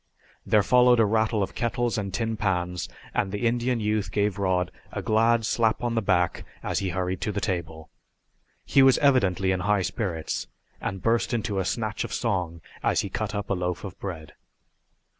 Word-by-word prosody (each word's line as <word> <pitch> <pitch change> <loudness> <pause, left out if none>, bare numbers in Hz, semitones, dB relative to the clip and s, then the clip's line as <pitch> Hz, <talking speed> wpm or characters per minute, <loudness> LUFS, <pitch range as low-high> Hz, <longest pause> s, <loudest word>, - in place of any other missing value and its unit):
There 105 -2 +4
followed 125 +1 +5
a 115 - +6
rattle 110 0 +1
of 95 - -5
kettles 120 0 -1
and 100 -3 -3
tin 110 +3 -1
pans 90 -4 -1 0.2
and 95 - 0
the 105 +4 -2
Indian 120 +1 +1
youth 105 -1 -1
gave 100 -1 0
Rod 90 -2 +1 0.2
a - - -4
glad 115 +1 +3
slap 110 +2 +1
on 120 -1 0
the 115 - +1
back 90 -4 +1 0.2
as - - -1
he 95 - -2
hurried 90 0 -2
to 105 - -1
the 100 - -2
table. 85 -5 -4 0.7
He 135 - +4
was 135 -1 +6
evidently 100 -10 +3
in 95 - 0
high 100 +1 +1
spirits, 90 -7 -3 0.3
and 95 -2 -4
burst 115 +1 +1
into 105 -3 -1
a 95 - -1
snatch 110 +1 -2
of - - -6
song 90 -8 -2 0.2
as - - +2
he 100 - -5
cut 105 0 -3
up 100 -1 -3
a - - +4
loaf 90 -1 -2
of 95 -5 -7
bread. 85 -6 -6
100 Hz, 190 wpm, -26 LUFS, 95-115 Hz, 0.7 s, a